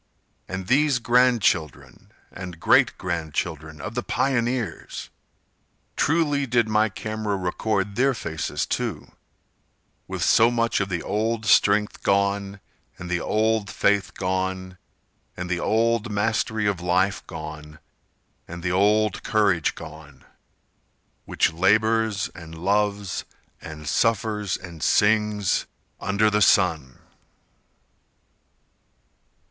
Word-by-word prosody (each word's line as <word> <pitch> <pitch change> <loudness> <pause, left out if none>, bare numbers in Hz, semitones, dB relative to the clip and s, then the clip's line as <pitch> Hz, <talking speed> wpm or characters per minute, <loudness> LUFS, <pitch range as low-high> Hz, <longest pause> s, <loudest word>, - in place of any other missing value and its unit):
And 95 0 -5
these 140 +4 +3
grand 125 -1 +3
children 80 -5 -2 0.2
and 90 -2 -8
great - - +4
grand 85 -4 -4
children 80 -2 -4
Of - - -6
the 120 - -2
pioneers! 120 -7 -2 0.8
Truly 145 -3 +1
did 120 -2 +2
my 110 0 +2
camera 110 0 -3
record 100 +2 -2
their 135 +2 +2
faces, 80 -7 -3
too, - - -4 1.0
With - - -3
so 115 +1 +5
much 115 -1 0
of 95 -1 -2
the 90 -3 -3
old 110 +2 -1
strength 105 0 +3
gone, 100 0 0 0.4
And 90 0 -7
the 90 - +1
old 110 -1 0
faith 100 -2 +1
gone, 95 0 -3 0.6
And 90 0 -5
the 90 - 0
old 115 +1 +1
mastery 110 +1 0
of 100 -4 0
life 90 +3 +1
gone, 75 -2 -8 0.7
And 85 0 -8
the 90 - 0
old 105 +2 +2
courage 100 -7 +1
gone, 75 -3 -12 1.0
Which - - +1
labors 110 +3 +2
and 80 -2 -11
loves 100 +1 0 0.4
and 75 -1 -9
suffers 105 +3 0
and 85 -4 -11
sings 105 0 +2 0.3
Under 100 +2 +1
the 105 0 +1
sun! 80 -10 +2
100 Hz, 110 wpm, -24 LUFS, 90-110 Hz, 1.0 s, so